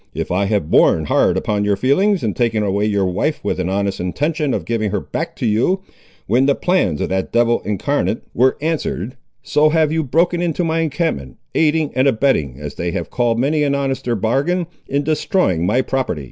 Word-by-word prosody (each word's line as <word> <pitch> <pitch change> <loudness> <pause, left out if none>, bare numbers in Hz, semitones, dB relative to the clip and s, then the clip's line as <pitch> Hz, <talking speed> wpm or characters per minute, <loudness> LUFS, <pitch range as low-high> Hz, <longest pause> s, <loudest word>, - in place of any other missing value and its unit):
If - - -3
I 95 +3 +1
have 100 -6 -1
borne 80 - +4
hard - - +2
upon 105 -1 -1
your 105 -1 +2
feelings, 180 - +2
in 110 -3 0
taking 115 -3 0
away 100 +1 0
your 100 -2 +1
wife 145 - -1
with 100 - -2
an 90 0 -1
honest 100 0 -1
intention 145 - -1
of - - -2
giving 110 -2 -1
her 105 - -1
back 165 +1 -5
to 125 - -4
you, 120 - +1 0.4
when 130 +3 +2
the 140 - +3
plans 175 - 0
of - - -1
that 95 0 -2
devil 120 0 +2
incarnate 110 +4 -1
were 130 +3 +3
answered, 145 - -2 0.3
so 150 +1 +3
have 155 -1 +2
you 160 0 0
broken 170 +5 +1
into 175 0 -1
my 165 0 0
encampment, 145 - -2 0.2
aiding 155 -1 +2
and 130 +2 +3
abetting, 110 - +1
as 75 -1 -6
they 85 - -3
have 85 0 -4
called 120 -2 +1
many 145 +5 +1
an 140 -1 +1
honester 135 -3 -1
bargain, 140 - 0 0.2
in 140 +1 0
destroying 150 - +1
my 125 +6 +2
property." 130 - -2
130 Hz, 200 wpm, -19 LUFS, 100-155 Hz, 0.4 s, borne